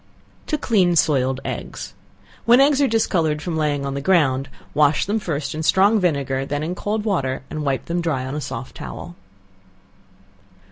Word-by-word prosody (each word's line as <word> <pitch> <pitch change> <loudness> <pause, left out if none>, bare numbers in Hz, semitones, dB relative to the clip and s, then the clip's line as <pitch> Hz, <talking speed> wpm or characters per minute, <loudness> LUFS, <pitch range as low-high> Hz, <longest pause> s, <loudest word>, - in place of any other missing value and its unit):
To 305 - 0
Clean 190 -10 +2
Soiled 135 -4 +2
Eggs. - - -6 0.5
When 240 +2 +6
eggs 280 0 +4
are 280 - +4
discolored 170 -9 +1
from 165 +1 -4
laying 145 -3 0
on 140 - -3
the 140 - -3
ground, 140 -6 +2 0.2
wash 150 0 +3
them 210 +3 0
first 155 -7 -3
in 155 - -4
strong 200 +6 +4
vinegar, 140 -7 0
and 135 - -4
then 145 +1 -1
in 165 +3 -2
cold 210 +3 -3
water, 135 -12 -1
and 155 - -3
wipe 135 -2 -1
them 175 +1 -1
dry 145 -6 -1
on 130 - -5
a 150 - -3
soft 125 -2 -6
towel. 175 - -8
155 Hz, 180 wpm, -21 LUFS, 140-190 Hz, 0.5 s, When